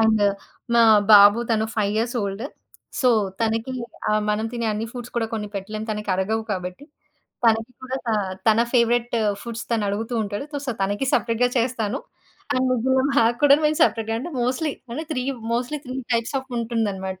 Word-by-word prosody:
And 220 -1 +3 0.5
మా 235 - +6 0.3
బాబు 205 +1 +9
తను 220 -1 +2
5 205 -1 +1
years 235 +2 -1
old. 200 +3 -4 0.6
So, 255 - +4 0.3
తనకి 225 +3 -1 0.4
ఆహ్, 215 0 +2
మనం 215 +1 0
తినే 235 -1 -2
అన్ని 215 +2 -3
ఫుడ్స్ 245 -1 -8
కూడా 230 -1 +1
కొన్ని 210 -2 -4
పెట్టలేం 215 +2 -5
తనకరగవు 210 +1 -1
కాబట్టి. 180 +6 -5 0.6
తనకి 225 +1 +3
కూడా 260 0 -3
త - - 0 0.4
తన 220 +1 +5
ఫేవరైట్ 240 -1 +2 0.3
ఫుడ్స్ 235 -1 -6
తనడుగుతూ 220 +1 -1
ఉంటాడు. 205 +4 -4 0.2
సో, - - 0
తనకి 205 +7 -1
సపరేట్‌గా 235 +1 +2
చేస్తాను. 230 -3 -1 0.5
అండ్ 255 +1 +1
ముగ్గురుం 260 +2 +2
మాకు 230 -2 +4
కూడాను 290 +1 +6
మేము 305 0 0
సపరేట్‌గా 225 -1 +1
అంటేm 300 +6 -6
మోస్ట్‌లీ 280 +4 -1 0.2
అంటే 310 +7 -4
3. 255 -4 -1 0.3
మోస్ట్‌లీ 250 +5 -2
3 255 +1 -5 0.2
టైప్స్ 230 +3 0
ఆఫ్ 265 - -18
ఉంటుందనమాట. 205 -5 -2
225 Hz, 160 wpm, -23 LUFS, 210-250 Hz, 0.6 s, బాబు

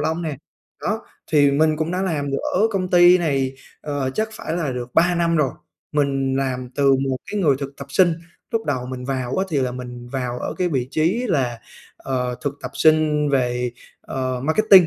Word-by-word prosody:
lông 160 +2 -1
nè. 155 -4 -3 0.5
Đó, 220 +2 -2 0.3
thì 145 -2 +6
mình 155 +2 +3
cũng 160 +2 -1
đã 185 +1 -1
làm 145 -6 -1
được 140 - 0 0.2
ở 210 +5 +4
công 185 -3 -1
ty 175 +1 +7
này, 135 -5 0 0.3
ờ, 145 -3 -2
chắc 220 0 0
phải 170 -5 -4
là 150 -7 -1
được 125 0 -6
3 175 +1 +4
năm 170 -1 +2
rồi. 145 -4 +2 0.4
Mình 135 -2 +1
làm 130 -2 -2
từ 140 -1 +4
một 135 -1 0
cái 210 -1 -1
người 145 -7 +4
thực 140 0 -6
tập 140 - -8
sinh, 175 +2 +4 0.4
lúc 225 -2 -1
đầu 130 -4 -1
mình 125 -1 -6
vào 130 -2 -2
á 190 - +2
thì 155 - -1
là 125 -2 0
mình 125 -1 -8
vào 125 -2 -3
ở - - -4
cái 180 -1 +2
vị 130 -5 -1
trí 180 +11 +1
là, 125 -8 0 0.4
ờ, 125 -2 -2
thực 145 0 -1
tập - - -4
sinh 155 -1 +3
về, 125 -2 +1 0.3
ờ, 130 -1 -3
Marketing, 185 +2 +6
145 Hz, 205 wpm, -22 LUFS, 130-170 Hz, 0.5 s, ty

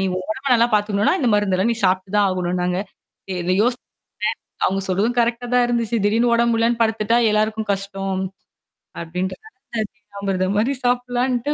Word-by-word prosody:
நீ! - - +1
உன் 185 0 -5
உடம்ப 265 +5 -5
நல்லா 235 +1 +3
பார்த்துக்கணுனா, 205 - +2
இந்த 245 - +2
மருந்தெல்லாம் 205 +1 +2
நீ 225 - -7
சாப்பிட்டு 185 +2 0
தான் 205 - +4
ஆகணுனாங்க. 180 0 -1 0.5
இ - - -2
இத 180 - 0
யோசிச்சன் 245 +2 0 0.8
அவுங்க 195 +1 0
சொல்றதும் 200 +6 +1
கரெக்ட்டா 235 +1 +1
தான் 250 0 +5
இருந்துச்சு. 235 -1 0
திடீர்ன்னு 225 +4 +3
உடம்பு 235 0 +3
முடியலன்னு 230 +1 +1
படுத்துட்டா, 220 0 +1
எல்லாருக்கும் 215 0 0
கஷ்டம். 195 -1 -3 0.8
அப்பிடின்றதனால, 190 - -5
தேனாமிர்தம்மாரி 200 +5 -1
சாப்புட்லான்ட்டு 245 +2 0
215 Hz, 145 wpm, -21 LUFS, 190-235 Hz, 0.8 s, தான்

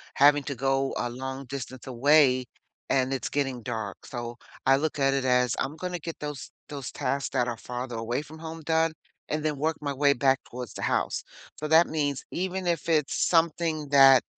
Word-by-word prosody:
having 145 +1 +6
to 140 - -3
go 135 +1 0
a 120 - -1
long 130 +2 -5
distance 130 -1 -7
away 130 0 +4 0.4
and 130 0 +2
it's 130 - -2
getting 135 -4 -1
dark, 110 -4 -5
so, 120 -1 -6 0.3
I 135 0 +6
look 155 +2 -1
at 135 0 +3
it 135 -1 0
as 125 -2 +3
I'm 140 +3 -2
gonna 180 +1 -4
get 165 +1 -7
those 150 -3 -6 0.2
those 140 -3 -6
tasks 140 0 -1
that 125 -2 0
are 120 -2 -3
farther 125 +1 -5
away 115 +5 -2
from 155 +1 -12
home 165 0 -7
done 160 +1 +2 0.4
and 155 0 -1
then 150 -1 +1
work 155 +3 0
my 145 -1 -2
way 140 +1 +4
back 135 0 +3
towards 125 -3 -7
the - - -7
house. - - 0 0.4
So 155 - -3
that 160 +2 +6
means 145 -3 -1
even 185 +1 -2
if 170 -1 -1
it's 155 -3 +2
something 165 -2 +1
that 135 -2 +8
140 Hz, 195 wpm, -27 LUFS, 130-155 Hz, 0.4 s, that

